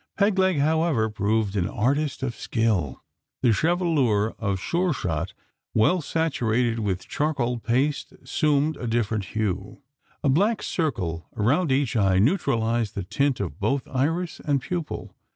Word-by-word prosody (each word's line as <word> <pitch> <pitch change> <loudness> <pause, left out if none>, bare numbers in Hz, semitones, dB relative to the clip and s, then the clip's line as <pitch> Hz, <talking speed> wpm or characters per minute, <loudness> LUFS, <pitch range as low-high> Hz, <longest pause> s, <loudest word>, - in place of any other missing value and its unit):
Peg 200 -1 +2
leg, 190 -3 +3
however, 150 -6 +2
proved 105 0 0
an 90 -3 +1
artist 135 +4 0
of 125 -3 -1
skill. 110 - -1 0.4
The 125 - +5
chevelure 145 - +2
of 100 -3 -1
Sure 175 - 0
shot, 85 - -3 0.4
well 165 +12 +3
saturated 125 -8 0
with 95 -4 -2
charcoal 135 -6 -1
paste, 135 +6 0
assumed 150 0 0
a 120 - -4
different 110 -3 0
hue. 100 +4 -3 0.4
A - - +2
black 205 - +2
circle 90 - -2
around 135 - +2
each 135 -2 +1
eye 95 -4 +3
neutralised 115 - +1
the 100 - -2
tint 140 +8 0
of 90 -6 -4
both 135 -1 0
iris 160 +6 -1
and 145 -2 +1
pupil. 170 +4 -5
125 Hz, 140 wpm, -25 LUFS, 105-155 Hz, 0.4 s, The